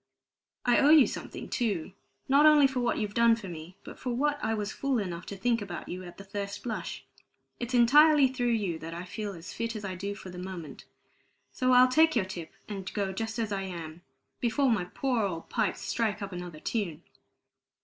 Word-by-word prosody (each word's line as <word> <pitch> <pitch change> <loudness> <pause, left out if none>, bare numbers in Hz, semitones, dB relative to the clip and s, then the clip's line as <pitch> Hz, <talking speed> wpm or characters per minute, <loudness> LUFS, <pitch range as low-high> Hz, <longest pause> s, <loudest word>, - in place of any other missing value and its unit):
I 245 -1 +4
owe 285 - +5
you 305 -4 +8
something, - - -6
too, 200 -8 -1 0.4
not 285 +3 +6
only 300 -2 +7
for 265 -1 +1
what 240 -1 +1
you've 210 -2 -2
done 235 0 +5
for 225 -4 -8
me, 170 +1 -9
but - - -11
for 255 - -4
what 290 +4 0
I 220 +1 +1
was 210 -1 -3
fool 275 -2 -1
enough 180 -5 -4
to 200 - -6
think 230 +2 +1
about 185 -4 -6
you 180 +1 -5
at 175 -1 -11
the 195 - -9
first 200 0 -5
blush. 225 -3 -5 0.5
It's 245 +1 -2
entirely 290 +4 +7
through 255 -1 -2
you 190 -7 -1
that 165 +1 -7
I 175 - -5
feel 205 +2 -5
as 170 -1 -9
fit 230 0 -3
as 210 -1 -5
I 190 - -3
do 200 +3 -4
for 185 - -9
the 180 - -8
moment. 180 -5 -7 0.7
So 255 0 +1
I'll 250 0 +8
take 315 +4 +4
your 220 -6 +2
tip, 175 -4 -7 0.2
and 195 -3 -5
go 195 -2 -1
just 225 +3 -4
as 225 -2 -2
I 195 -1 -1
am, 170 -3 -7 0.4
before 245 +3 +2
my 200 -6 +1
poor 250 +5 -1
old 165 -5 -3
pipes - - 0
strike 215 -2 -1
up 200 - -5
another 175 -3 -7
tune." 175 -5 -3
210 Hz, 210 wpm, -29 LUFS, 185-245 Hz, 0.7 s, you